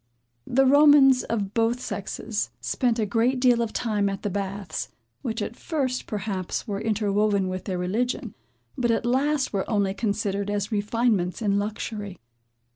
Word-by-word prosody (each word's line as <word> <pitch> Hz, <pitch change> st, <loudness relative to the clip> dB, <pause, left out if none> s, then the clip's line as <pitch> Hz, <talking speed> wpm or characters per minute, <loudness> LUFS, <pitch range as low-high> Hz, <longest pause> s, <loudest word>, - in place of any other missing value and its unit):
The 270 Hz, +2 st, +3 dB
Romans, 280 Hz, -2 st, +7 dB
of 205 Hz, -3 st, -2 dB
both 230 Hz, +1 st, +1 dB
sexes, -, -, -3 dB
spent 245 Hz, -3 st, 0 dB
a 220 Hz, -, +1 dB
great 235 Hz, +5 st, +1 dB
deal 245 Hz, -2 st, +4 dB
of 230 Hz, -2 st, -1 dB
time 210 Hz, -4 st, 0 dB
at 195 Hz, -1 st, -5 dB
the 205 Hz, -, -1 dB
baths; 200 Hz, 0 st, -4 dB, 0.3 s
which 225 Hz, -2 st, -2 dB
at 220 Hz, -, -5 dB
first, 265 Hz, -5 st, -2 dB
perhaps, 200 Hz, -1 st, -3 dB
were 200 Hz, -1 st, -3 dB
interwoven 210 Hz, -2 st, +1 dB
with 185 Hz, 0 st, -4 dB
their 185 Hz, -3 st, -2 dB
religion, 220 Hz, +5 st, -2 dB, 0.4 s
but 240 Hz, -1 st, 0 dB
at 230 Hz, 0 st, +1 dB
last 270 Hz, +3 st, +1 dB
were 195 Hz, -1 st, -1 dB
only 200 Hz, -3 st, +1 dB
considered 200 Hz, -1 st, -1 dB
as 205 Hz, 0 st, -2 dB
refinements 210 Hz, -3 st, 0 dB
in 200 Hz, -3 st, +1 dB
luxury. 205 Hz, -1 st, -4 dB
215 Hz, 155 wpm, -25 LUFS, 200-245 Hz, 0.4 s, Romans